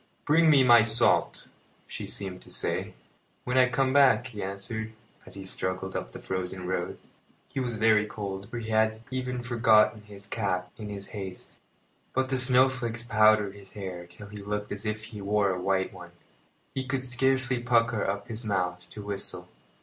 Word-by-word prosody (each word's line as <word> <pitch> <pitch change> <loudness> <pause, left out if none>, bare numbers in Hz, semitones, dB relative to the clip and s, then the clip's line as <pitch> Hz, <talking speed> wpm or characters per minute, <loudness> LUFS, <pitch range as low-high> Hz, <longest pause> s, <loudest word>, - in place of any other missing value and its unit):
"Bring 160 +2 +5
me 140 -4 +6
my 120 -2 +8
salt," 115 +2 +2 0.4
she - - -6
seemed 95 -2 -4
to - - -15
say. - - -2 0.5
"When 125 - -2
I 130 -1 +5
come 130 +1 +1
back," 135 -6 +5
he 115 -6 -7
answered, 110 +3 -4 0.3
as - - -11
he 95 -1 -8
struggled 95 0 -3
up - - -4
the - - -8
frozen 95 0 -4
road. 90 -1 -2 0.5
He 135 - -4
was 125 -3 -2
very 110 -1 +4
cold, 100 -1 -6
for 120 - -5
he 110 -1 -5
had 110 0 +2
even 125 -1 -3
forgotten 115 -3 +4
his 100 -1 -12
cap 90 -4 -2
in 105 -2 -7
his 100 -1 -7
haste; 95 -3 -8 0.6
but 130 0 +1
the 130 -1 +1
snowflakes 125 -2 +3
powdered 110 -3 +4
his 100 -1 -14
hair 90 -4 -6
till 90 +4 -12
he 105 - -9
looked 105 +1 -4
as 105 +2 -4
if 110 0 -2
he 110 -2 -8
wore 100 0 +2
a 90 -1 -3
white 95 0 0
one. 90 -2 -11 0.6
He 130 - -2
could 130 0 -2
scarcely 130 0 +1
pucker 115 -2 +2
up 100 +2 -2
his 115 0 -4
mouth 90 -4 -2
to 105 - -9
whistle. 100 -1 -3
110 Hz, 180 wpm, -28 LUFS, 100-125 Hz, 0.6 s, my